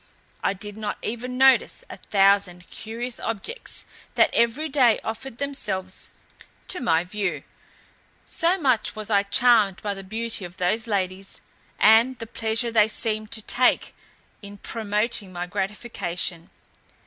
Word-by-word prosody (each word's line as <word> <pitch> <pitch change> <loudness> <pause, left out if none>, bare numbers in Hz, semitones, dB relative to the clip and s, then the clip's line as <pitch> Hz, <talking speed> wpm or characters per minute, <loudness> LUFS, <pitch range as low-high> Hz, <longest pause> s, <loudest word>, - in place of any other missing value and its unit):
I - - +2
did 205 +2 -7
not 210 -1 -3
even 250 +3 -4
notice 265 0 +4
a - - -9
thousand 195 -3 +2
curious 235 +2 -6
objects 230 - -3 0.3
that - - +4
every 235 +7 +2
day 260 -6 +4
offered 225 +2 -6
themselves 190 -10 -4 0.6
to 365 - 0
my 165 -7 +2
view, 180 -6 -3 0.8
so 350 +3 +1
much 255 -8 +1
was 215 0 -5
I 200 -1 +5
charmed 205 -1 +4
by 205 -1 -1
the 195 0 -8
beauty 225 +2 -4
of 175 0 -9
those 215 +6 0
ladies, 195 -2 -2 0.4
and 230 +4 +6
the 230 - -6
pleasure 225 +1 -1
they 215 -2 +5
seemed 215 -1 -2
to 220 - -4
take 250 +3 +2 0.5
in 205 0 -10
promoting 210 -1 -1
my 175 -1 -4
gratification. 180 -3 -3
215 Hz, 135 wpm, -24 LUFS, 195-235 Hz, 0.8 s, and